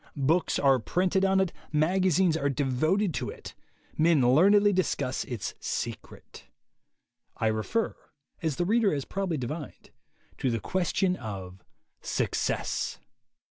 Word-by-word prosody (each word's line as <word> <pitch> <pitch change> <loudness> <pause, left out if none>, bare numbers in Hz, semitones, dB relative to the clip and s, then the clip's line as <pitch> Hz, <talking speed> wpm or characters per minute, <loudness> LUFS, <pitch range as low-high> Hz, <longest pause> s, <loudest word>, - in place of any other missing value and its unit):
Books 155 +5 +1
are 135 -2 +4
printed 185 - 0
on 195 0 +3
it; 190 -2 0 0.2
magazines 180 +2 +2
are 145 -3 0
devoted 155 +8 +1
to - - -3
it; - - -9 0.5
men 150 -6 +4
learnedly 200 +6 +5
discuss 140 -8 -1
its 120 -5 -5
"secret." - - -6 0.9
I - - -1
refer, 110 - 0 0.5
as 160 -4 -1
the 175 - -1
reader 220 +1 +3
has 140 - -3
probably 190 -4 -2
divined, 145 +3 -6 0.5
to 130 - +1
the 115 -1 -1
question 185 - 0
of 95 -4 -8 0.4
Success. - - -1
160 Hz, 125 wpm, -28 LUFS, 130-190 Hz, 0.9 s, learnedly